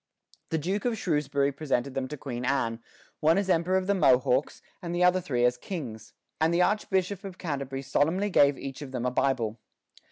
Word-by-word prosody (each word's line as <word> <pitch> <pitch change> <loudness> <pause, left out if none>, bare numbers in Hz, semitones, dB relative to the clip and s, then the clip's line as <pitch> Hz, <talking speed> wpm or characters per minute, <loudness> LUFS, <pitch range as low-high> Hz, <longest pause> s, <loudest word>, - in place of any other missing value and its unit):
The 160 - 0
Duke 190 +8 -2
of 240 -2 0
Shrewsbury 145 -5 0
presented 135 -2 -2
them 130 -1 -2
to 150 - -7
Queen 125 -3 -5
Anne, 120 -4 0 0.4
one 160 +3 +4
as 195 -1 +1
emperor 180 +2 +2
of 190 - -1
the 200 - +2
Mohawks, 130 -5 +2 0.2
and 170 -1 -4
the 175 - +2
other 180 +1 +4
three 125 -7 0
as 125 0 +2
kings, 125 - -7 0.3
and 160 +1 +3
the 175 +1 +3
Archbishop 190 -1 0
of 190 -2 -8
Canterbury 140 -4 -4
solemnly 185 +10 +1
gave 140 -4 +5
each 135 0 -7
of 135 -2 -8
them 125 -1 -2
a 125 - +1
Bible. 120 -4 0
145 Hz, 195 wpm, -28 LUFS, 130-180 Hz, 0.4 s, gave